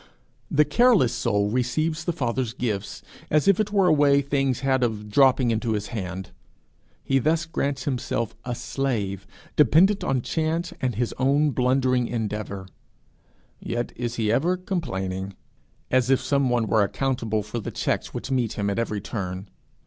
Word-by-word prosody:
The 150 +1 +4
careless 200 - +4
soul 105 -3 0
receives 155 +7 -1
the 175 - +1
Father's 125 -6 -2
gifts 110 -6 -3 0.3
as 155 +2 +2
if 200 -1 +5
it 210 -1 0
were 200 -2 +3
a 180 - +5
way 145 -2 +4
things 135 -2 0
had 135 -1 +1
of 105 -3 -2
dropping 130 0 +4
into 115 0 0
his 105 -1 -3
hand. 95 -4 -5 0.7
He 135 - +2
thus 160 +5 +1
grants 140 -4 -2
himself 125 -4 -2
a 125 -1 -3
slave, 105 -9 -3 0.3
dependent 165 - +4
on 130 -3 0
chance 165 +2 -1
and 125 -4 -1
his 120 +2 -1
own 140 +3 +3
blundering 125 -1 +2
endeavour 105 -4 -4 0.9
yet 120 0 -3
is 120 -1 -3
he 110 -2 0
ever 170 +10 +2
complaining, 95 - -3 0.6
as 130 -1 +3
if 135 - +4
some 140 -2 +1
one 120 -2 +1
were 110 +1 +2
accountable 110 0 -1
for 105 +3 -5
the - - -5
checks - - -2
which - - -6
meet 125 -4 0
him 100 -1 -1
at 100 - -2
every 105 -3 -2
turn. 95 -3 -5
125 Hz, 165 wpm, -24 LUFS, 110-145 Hz, 0.9 s, if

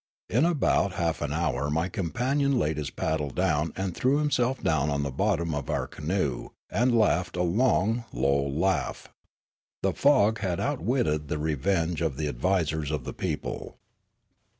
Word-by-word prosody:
In 125 +8 +4
about 145 - +2
half 85 -3 -1
an 75 -1 -2
hour 75 -4 -1
my 80 +4 0
companion 130 - 0
laid 80 -8 0
his 75 -2 -3
paddle 80 -2 -2
down 80 -1 0
and 95 -2 -2
threw 135 +3 +2
himself 135 -4 0
down 75 -2 +2
on 70 0 0
the 70 - -2
bottom 85 +1 0
of 70 -1 -4
our - - 0
canoe 75 -6 -2 0.2
and 120 +4 +2
laughed 95 -4 +2
a 90 - +2
long, 115 +3 +2
low 70 +3 +1
laugh. 85 +8 -1 0.7
The - - +2
fog 115 -6 +4
had 90 -4 -1
outwitted 120 - 0
the 75 - -2
revenge 80 +2 0
of 80 -5 -1
the 75 - -1
advisers 80 +1 0
of 75 -4 -2
the - - -6
people. - - -4
85 Hz, 160 wpm, -27 LUFS, 75-110 Hz, 0.7 s, In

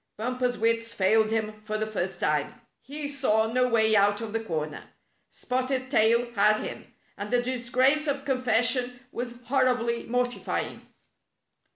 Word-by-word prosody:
Bumper's 250 +2 -1
wits 230 +1 0
failed 215 +3 +3
him 215 -1 -2
for 215 0 -3
the 215 - -1
first 190 -4 -3
time. 150 -1 -1 0.2
He 290 +2 -5
saw 225 -6 +1
no 250 0 +3
way 220 -2 +3
out 205 0 +3
of 225 -2 -6
the 225 0 -1
corner. 155 -6 -4 0.4
Spotted 255 +1 -2
Tail 235 0 +3
had 215 0 +4
him, - - -7 0.3
and 205 +1 -4
the 245 +1 +2
disgrace 255 +4 +1
of 280 -1 -2
confession 250 -1 +1
was 240 0 -6
hor 260 +2 +2
ribly 235 -2 0
mortifying. 245 +1 -2
235 Hz, 150 wpm, -27 LUFS, 215-255 Hz, 0.4 s, had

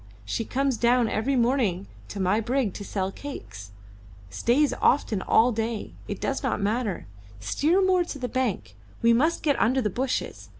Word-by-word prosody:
She 160 - -2
comes 270 0 0
down 240 0 +3
every 240 +6 0
morning 235 -7 +1 0.2
to 200 - -7
my 190 +3 +2
brig 240 -3 0
to 205 - -7
sell 195 -1 -2
cakes 105 - -9 0.6
stays 270 - +2
often 225 -7 +2
all 235 +5 +4
day. 225 -1 -3
It - - -5
does - - -2
not - - -1
matter; 210 0 -1 0.3
steer 310 - +1
more 370 -1 +3
into 345 -4 -2
the 255 -2 -3
bank; 225 - -2 0.3
we 230 0 +6
must 310 +8 +1
get 290 -3 +2
under 255 +4 +3
the 210 -5 0
bushes. 255 +5 -3
235 Hz, 170 wpm, -26 LUFS, 205-270 Hz, 0.6 s, we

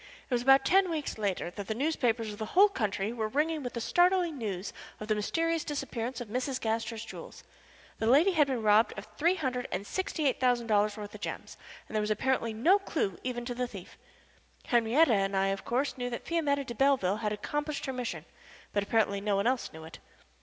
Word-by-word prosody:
It - - -4
was 240 - +2
about 270 +2 +5
ten 385 0 +4
weeks 305 -8 -3
later 195 -4 -1
that 200 +1 -7
the 220 - -2
newspapers 235 -6 0
of 205 - -11
the 220 - -3
whole 410 +2 +8
country 215 - -2
were 220 -2 -2
ringing 305 +6 0
with 245 -2 -5
the 235 - -3
startling 350 +3 +3
news 200 -6 -4 0.3
of 215 - -6
the 215 - +2
mysterious 330 +10 0
disappearance 260 -4 -4
of 245 - -6
Mrs. 255 +4 -2
Gaster's 225 0 -2
jewels. 220 - -10 0.6
The 220 - 0
lady 295 +11 +5
had 305 -5 +3
been 255 -4 -2
robbed 215 +1 +4
of 205 - -6
three 340 +4 +2
hundred 255 -7 -2
and 200 - -3
sixty 340 - -2
eight 260 - 0
thousand 245 -2 +2
dollars 210 -1 +2
worth 205 -1 -7
of - - -10
gems, - - -6 0.3
and - - -8
there 215 - +2
was 210 - -2
apparently 230 +1 0
no 330 - +4
clew 250 - -2
even 240 -1 -3
to 245 - -3
the 250 +1 -2
thief. 195 -6 -11 0.7
Henriette 240 +6 +3
and 195 -2 +1
I, 195 0 +2
of 195 0 -3
course, 260 +4 0
knew 245 0 -2
that 235 - -6
Fiametta 290 -4 0
de 240 - -5
Belleville 245 -7 +2
had 215 -1 -2
accomplished 295 +8 -3
her 265 - -3
mission, 250 -2 -4 0.5
but 205 - +2
apparently 200 -1 +1
no 205 0 0
one 200 +1 0
else 255 0 0
knew 160 0 -10
it. 160 - -11
240 Hz, 215 wpm, -30 LUFS, 215-280 Hz, 0.7 s, whole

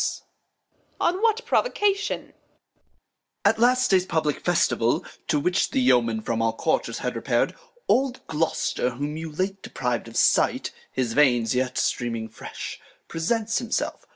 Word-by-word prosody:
Reg. - - -3 0.7
On 360 +3 +1
what 455 +1 +2
Provocation? 415 -4 0
Off. - - -23 1.1
At - - +4
last 250 +1 +4
Day's 185 -2 +5
publick 160 -5 -1
Festival, 140 -9 +2 0.2
to 150 - +2
which 180 +5 +1
The 270 - 0
Yeomen 115 - +3
from 115 0 -1
all 115 0 +1
Quarters - - -1
had - - -3
repair'd. - - 0 0.3
Old 265 -1 +1
Gloster, 160 -5 0
whom 145 +4 -3
you 160 0 -5
late 190 +5 -2
depriv'd 125 -2 -3
of 115 - -7
Sight, - - +3 0.2
(His 125 -3 -1
Veins 120 -6 +3
yet 130 0 -1
streaming 115 -2 -1
fresh,) 110 - -8 0.3
presents 220 +7 0
himself. 235 -2 -3
160 Hz, 145 wpm, -25 LUFS, -, 1.1 s, Day's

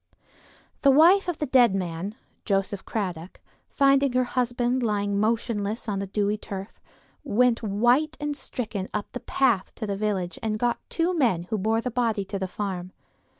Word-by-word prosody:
The 280 - +5
wife 340 +8 +6
of 350 -3 -2
the 300 - -1
dead 245 -6 +4
man, 180 +2 -3 0.3
Joseph 195 -1 -1
Cradock, 180 -5 -4 0.3
finding 275 -1 +3
her 255 0 +3
husband 245 0 0
lying 205 -3 0
motionless 220 0 -1
on 200 -2 -1
the 195 - -3
dewy 205 +1 0
turf, 195 +1 -7 0.4
went 250 -2 +2
white 240 +9 +2
and 295 0 -2
stricken 215 -9 -5
up 210 - -3
the 250 - -5
path 240 -9 +1
to 220 - -4
the 200 -1 -2
village 195 -3 -2
and 215 -1 -1
got 240 +2 0
two 340 +2 0
men 230 - +2
who 220 - +1
bore 220 +3 +1
the 250 - -3
body 225 -4 0
to 195 +1 -4
the 190 - -2
farm. 185 -2 -5
220 Hz, 170 wpm, -25 LUFS, 200-250 Hz, 0.4 s, wife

